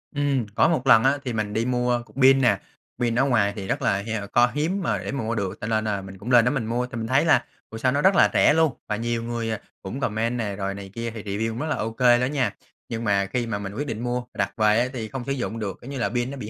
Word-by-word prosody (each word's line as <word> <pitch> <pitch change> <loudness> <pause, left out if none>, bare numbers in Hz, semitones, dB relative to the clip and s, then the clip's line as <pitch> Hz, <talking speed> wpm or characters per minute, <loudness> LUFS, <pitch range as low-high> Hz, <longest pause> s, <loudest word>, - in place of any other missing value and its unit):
Ừm, 140 -4 +1
có - - +5
một 140 -6 0
lần 115 -3 +7
á, 135 +2 +3
thì 125 - -2
mình 105 -2 -2
đi 110 +2 0
mua 125 -1 +1
cục - - -22
pin 135 +1 +6
nè. 125 - +3 0.4
Pin 120 -2 0
ở 135 - +4
ngoài 110 -7 +2
thì 100 -3 -6
rất 135 +8 -1
là, 100 -6 +1 0.2
à, - - -6
co 120 0 +5
hiếm 170 +7 0
mà 115 - 0
để 95 - -4
mà 140 - -3
mua 115 +1 -2
được, 100 -4 -3
cho 110 - -3
nên 110 -1 +1
là 100 -2 -1
mình 95 0 -10
cũng 105 +6 -6
lên 120 -2 +6
đó 125 - +3
mình 135 -5 -1
mua. 120 +2 -1
Thì 125 -1 -7
mình 115 -1 -3
thấy 135 +6 +3
là 160 - +4 0.2
ủa 110 - -7
sao 130 +3 +1
nó 140 +2 +1
rất 190 +3 +4
là - - +6
rẻ - - +5
luôn, 160 -2 +3
và 105 - -1
nhiều 115 +1 -2
người, 115 -1 -3
à, 110 - -3 0.2
cũng 100 +8 -6
comment 115 0 -1
nè 105 -4 -2
rồi 100 -1 -3
này 100 0 -8
kia, 115 +1 -4
thì 110 -2 -8
review 105 +2 -2
cũng 115 +1 -5
rất 155 - -2
là - - 0
OK 115 +2 -4
đó 125 -1 +5
nha. 125 -8 0 0.3
Nhưng 115 0 -4
mà 100 -3 +2
khi 125 -2 0
mà 100 -3 -2
mình 100 -1 -6
quyết 145 +7 -4
định 115 -2 -4
mua 125 0 -1
mình 125 - -10
đặt 100 0 -2
về 105 0 +4
á, 125 - +2
thì 115 -4 -4
không 130 +2 -6
sử 140 - -3
dụng 125 -4 -3
được, 100 -3 -4
kiểu 125 - -10
như 140 - -5
là 120 - 0
pin 120 +2 -2
nó 140 - -7
bị 110 -5 -6
115 Hz, 315 wpm, -24 LUFS, 110-130 Hz, 0.4 s, lần